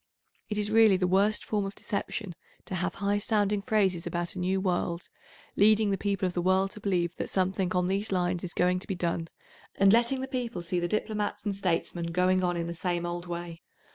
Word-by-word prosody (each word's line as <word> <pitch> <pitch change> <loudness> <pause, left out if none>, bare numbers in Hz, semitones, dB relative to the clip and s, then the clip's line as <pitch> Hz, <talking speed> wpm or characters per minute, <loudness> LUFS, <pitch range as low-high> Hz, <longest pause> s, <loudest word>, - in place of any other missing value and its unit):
It 210 - -2
is 210 0 0
really 220 -3 +6
the 185 - +1
worst 200 +4 +2
form 210 -2 0
of 195 0 -5
deception 200 -1 -4 0.3
to - - -7
have 180 -1 -1
high 205 +1 0
sounding 205 -1 +1
phrases 195 -5 +1
about 175 0 -3
a 185 - -6
new 185 +2 +1
world, 175 -2 -1 0.5
leading 215 0 +4
the - - +2
people 200 -2 0
of 180 - -1
the 175 - -1
world 190 +2 +2
to - - -10
believe 175 -4 0
that - - -3
something 190 0 0
on 180 -1 +2
these 195 +3 -1
lines 180 -1 0
is 175 - -5
going 180 +1 +2
to - - -8
be 195 - -2
done, 170 -1 -2 0.5
and 195 +1 +5
letting 240 +3 +3
the 265 - -3
people; 245 -8 -3
see 175 +1 -1
the 175 - -1
diplomats 215 +2 -2
and 205 -2 -1
statesmen 175 -2 -1
going 180 +2 +2
on 175 -1 0
in 170 - -2
the 170 - -4
same 175 0 -1
old 175 0 -4
way. 170 -1 -6
185 Hz, 220 wpm, -28 LUFS, 175-205 Hz, 0.5 s, really